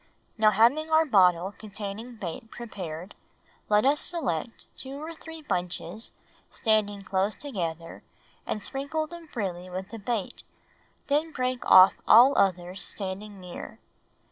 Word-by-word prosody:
Now 215 -1 +5
having 240 +10 +3
our 320 0 +5
bottle 185 - +4
containing 215 +3 -7
bait 215 +3 -7
prepared, 185 -7 -7 0.6
let 210 +3 +4
us 290 +2 +3
select 245 - -3
two 265 0 -8
or 315 +2 -6
three 320 -1 -11
bunches 180 - -3 0.4
standing 210 -3 0
close 195 +1 0
together 170 - -5 0.5
and 210 - -3
sprinkle 285 +3 -2
them 335 +1 -11
freely 185 - -4
with 190 +2 -6
the 230 - -7
bait, 210 -2 -3 0.6
then 300 +3 0
break 255 -3 -2
off 185 0 +9
all 245 +6 +8
others 185 0 +1
standing 200 +1 -5
near. 180 -1 -9
215 Hz, 130 wpm, -27 LUFS, 185-265 Hz, 0.6 s, off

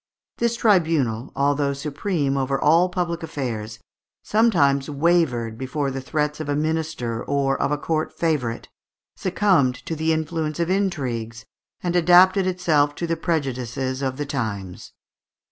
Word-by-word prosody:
This 235 0 +1
tribunal, 160 - +1
although 140 0 +1
supreme 145 +1 -2
over 135 0 0
all 165 +5 +4
public 175 -2 -2
affairs, 115 -9 -4 0.5
sometimes 150 -11 +2
wavered 140 -7 +1
before 135 +1 -2
the 135 0 -4
threats 150 +2 -2
of 155 -2 -5
a 145 - +1
minister 155 -7 -2
or 140 -1 0
of - - 0
a 150 - +1
court 155 +1 -2
favourite, 145 -9 -1 0.5
succumbed 185 -9 +2
to 165 - -3
the 160 +1 0
influence 160 0 -2
of 170 +1 0
intrigues, 125 - -2 0.4
and 175 -1 -1
adapted 180 +2 +5
itself 155 -6 +1
to 170 - -3
the 165 0 0
prejudices 130 -5 -2
of 130 -1 -2
the 145 - -3
times. 105 -10 -5
150 Hz, 140 wpm, -23 LUFS, 130-170 Hz, 0.5 s, adapted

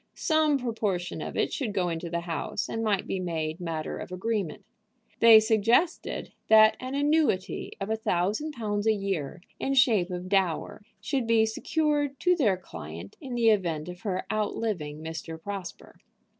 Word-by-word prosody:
Some 310 -3 +2
proportion 215 -8 -2
of - - -5
it - - 0
should 225 -8 -3
go 180 -2 +1
into 170 0 -4
the 170 0 -2
house, 165 -3 -3
and 225 - -3
might 205 -3 +1
be 190 - -2
made 160 -2 -3
matter 165 -3 -4
of - - -8
agreement. 190 -2 -3 0.5
They 230 -1 +9
suggested 225 - +1
that 215 0 +7
an 255 +2 -5
annuity 285 -9 +1
of 195 +2 -3
a - - +2
thousand 215 - -1
pounds 210 -4 -2
a 220 - +5
year, 190 -5 -3 0.2
in 275 - -1
shape 225 -9 +4
of 180 0 -5
dower, 190 -3 0 0.2
should 235 +2 -1
be 225 -1 +4
secured 290 +4 0
to 360 0 +4
their 215 - +2
client 85 - -9
in 255 -3 -5
the 230 -1 +4
event 170 -7 0
of 180 +1 -9
her 185 -4 -2
outliving 200 -8 -2
Mr. 160 0 -6
Prosper. 195 0 -7
205 Hz, 165 wpm, -27 LUFS, 175-230 Hz, 0.5 s, They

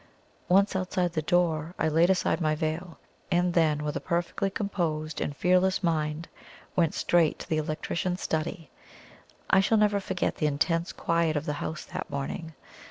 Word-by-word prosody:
Once 195 +2 +4
outside 180 -2 0
the 155 - 0
door 165 0 +1
I - - +1
laid 165 +3 +4
aside 185 -1 +1
my 155 -1 +2
veil, 160 +3 -3 0.3
and 175 0 +2
then, 155 -3 +2
with 150 0 -2
a - - -1
perfectly 175 +3 -1
composed 165 -7 -2
and 145 - -3
fearless 185 +1 +2
mind, 155 -1 -1 0.5
went 165 -3 +2
straight 170 -3 +2
to - - -9
the 155 - 0
Electrician's 170 +3 -2
study. 160 0 -3 0.8
I 190 - +6
shall 205 +3 +3
never 210 -1 +3
forget 190 -2 -2
the 155 - +1
intense 165 +4 0
quiet 165 -1 0
of 150 +1 -1
the 150 - -1
house 155 - -4
that - - -6
morning. 150 +3 -5
170 Hz, 165 wpm, -28 LUFS, 155-180 Hz, 0.8 s, I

